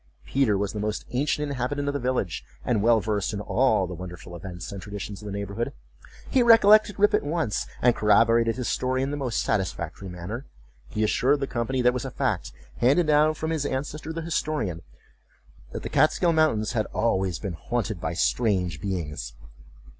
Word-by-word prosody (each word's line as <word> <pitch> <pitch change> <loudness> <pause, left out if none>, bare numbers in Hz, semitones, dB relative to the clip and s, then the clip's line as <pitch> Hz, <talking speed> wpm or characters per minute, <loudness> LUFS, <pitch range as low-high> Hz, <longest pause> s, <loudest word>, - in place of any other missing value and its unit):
Peter 130 -7 +2
was 100 0 -2
the 105 - -4
most 105 +1 -2
ancient 145 +3 0
inhabitant 140 +1 -2
of 145 - 0
the 140 - -1
village, 125 - -1 0.2
and 110 -4 +1
well 115 +1 +5
versed 105 -1 -1
in 100 - -3
all 110 -2 +2
the 90 - -6
wonderful 90 -1 -8
events 90 +1 -7
and 100 -1 -6
traditions 100 0 -7
of 105 - -8
the - - -5
neighborhood. 100 +3 -3 0.5
He 260 - +3
recollected 215 -3 +6
Rip 205 +1 +4
at - - +3
once, 150 -6 -1 0.2
and 120 -1 +5
corroborated 115 +2 +4
his 125 -2 -3
story 130 +1 0
in 135 - -2
the - - -2
most 130 -5 -1
satisfactory 95 -2 -2
manner. 90 +9 -6 0.4
He 110 - -1
assured 135 +6 +2
the 135 - -1
company 125 0 -1
that 125 - +6
it - - 0
was 125 - -3
a - - -3
fact, - - -2 0.3
handed 140 +8 +4
down 155 +1 +4
from 160 +1 -3
his 160 -3 0
ancestor 145 +3 -3
the 165 0 -4
historian, 150 - -2 0.9
that - - -6
the - - -4
Kaatskill 170 +2 +3
mountains 150 -10 +2
had 110 -3 -1
always 95 -6 0
been 100 -4 -5
haunted 110 +1 -3
by - - -2
strange 90 -5 0
beings. 75 -11 -4
115 Hz, 190 wpm, -26 LUFS, 100-145 Hz, 0.9 s, recollected